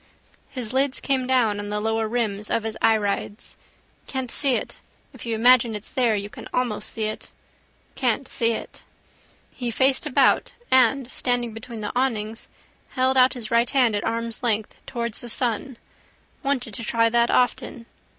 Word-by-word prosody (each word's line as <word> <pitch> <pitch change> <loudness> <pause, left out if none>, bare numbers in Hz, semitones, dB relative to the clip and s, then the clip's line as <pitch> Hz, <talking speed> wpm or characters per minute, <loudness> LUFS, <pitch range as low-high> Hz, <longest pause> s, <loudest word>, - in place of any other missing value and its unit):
His 250 -4 -3
lids 270 +1 +1
came 265 -2 0
down 235 -6 +2
on 205 0 -5
the 210 0 -1
lower 225 +1 0
rims 215 -3 -1
of 230 - 0
his 220 -1 -4
irides. 210 -1 0 0.5
Can't 260 -3 -4
see 275 -4 +3
it. - - -4 0.3
If - - -10
you 230 - -1
imagine 235 0 +5
it's 210 - -7
there 240 -4 +2
you 200 0 -3
can - - -11
almost 245 -4 -1
see 220 - -3
it. 215 0 -4 0.6
Can't 255 +1 0
see 235 -4 +1
it. 230 - -5 0.7
He 245 -2 -4
faced 265 +5 +2
about 285 - +3 0.2
and, 260 0 +3
standing 245 -2 -1
between 225 0 -8
the 210 - -3
awnings, 225 -4 -1 0.5
held 260 0 +2
out 255 0 +5
his 235 -4 -3
right 235 +1 +3
hand 250 -6 +3
at 205 - -2
arm's 230 0 -2
length 220 -3 0
towards 235 -2 -3
the 240 - -7
sun. 240 +1 0 0.6
Wanted 260 -6 -2
to 230 - -6
try 230 +1 +2
that 235 +1 +3
often. 245 -1 0
235 Hz, 170 wpm, -23 LUFS, 220-255 Hz, 0.7 s, imagine